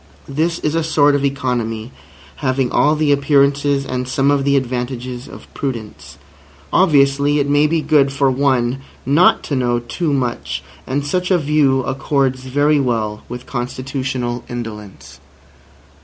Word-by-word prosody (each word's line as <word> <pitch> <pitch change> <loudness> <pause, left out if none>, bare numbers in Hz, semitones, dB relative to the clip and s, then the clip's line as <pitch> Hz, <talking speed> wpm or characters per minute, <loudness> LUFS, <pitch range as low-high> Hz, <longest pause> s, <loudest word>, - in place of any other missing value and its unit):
This 160 +5 -1
is 150 - -2
a 165 0 +1
sort 145 -2 +3
of 140 -1 0
economy 125 -4 -2 0.5
having 130 -2 0
all 150 +1 +3
the 150 -1 +1
appearances 140 0 +2
and 125 -1 -3
some 135 +2 +1
of 140 -1 +1
the 140 0 +3
advantages 125 -1 -4
of - - -11
prudence. 105 - -6 0.6
Obviously 145 -4 +3
it 145 -1 +1
may 145 +1 +3
be 160 +1 0
good 140 -3 +3
for 135 -1 +2
one 130 -1 +1 0.2
not 145 +7 +4
to 145 - -3
know 120 -2 +1
too 145 +7 -3
much. 125 - -2 0.2
And 140 +2 -1
such 180 +5 -1
a 185 - +4
view 145 -4 +2
accords 135 -1 -1
very 145 +3 +2
well 110 -5 -1
with 125 +1 -7
constitutional 130 -1 -3
indolence. 110 -5 -8
135 Hz, 145 wpm, -18 LUFS, 125-145 Hz, 0.6 s, not